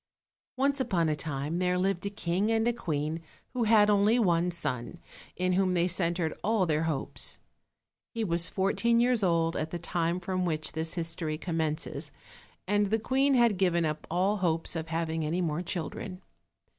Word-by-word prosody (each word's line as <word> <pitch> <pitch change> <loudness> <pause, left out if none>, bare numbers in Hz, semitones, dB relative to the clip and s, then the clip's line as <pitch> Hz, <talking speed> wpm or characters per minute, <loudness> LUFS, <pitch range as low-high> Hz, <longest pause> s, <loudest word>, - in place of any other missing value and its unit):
ONCE 280 +2 +2
upon 175 -10 +1
a 155 - +1
time 150 +2 -3
there 180 0 +1
lived 185 -1 0
a - - -1
king 195 +1 -1
and 225 0 +2
a 240 - +2
queen 160 -7 -2 0.3
who 245 -2 0
had 215 -1 +6
only 210 +3 +4
one 175 -6 +2
son, 165 -5 -3 0.4
in 185 0 0
whom 185 0 +2
they 175 0 +2
centered 170 -2 +1
all 215 -2 +2
their 160 -1 +1
hopes. 155 -4 -1 0.8
He 230 - -1
was 170 -4 +2
fourteen 230 +5 +2
years 245 -1 +3
old 165 -3 +2
at 155 - -2
the 175 - -4
time 170 0 -1
from 185 0 -2
which 155 -3 -1
this 160 +1 -3
history 165 -2 -2
commences, 160 -2 -2 0.6
and 205 +1 +2
the 220 +3 +2
queen 270 +5 +2
had 235 -5 +4
given 175 -3 +2
up 155 0 -3
all 190 +4 +1
hopes 165 -3 0
of 165 0 -3
having 160 0 -2
any 160 +4 -1
more 165 -2 -1
children. 180 +1 -5
175 Hz, 175 wpm, -29 LUFS, 165-205 Hz, 0.8 s, had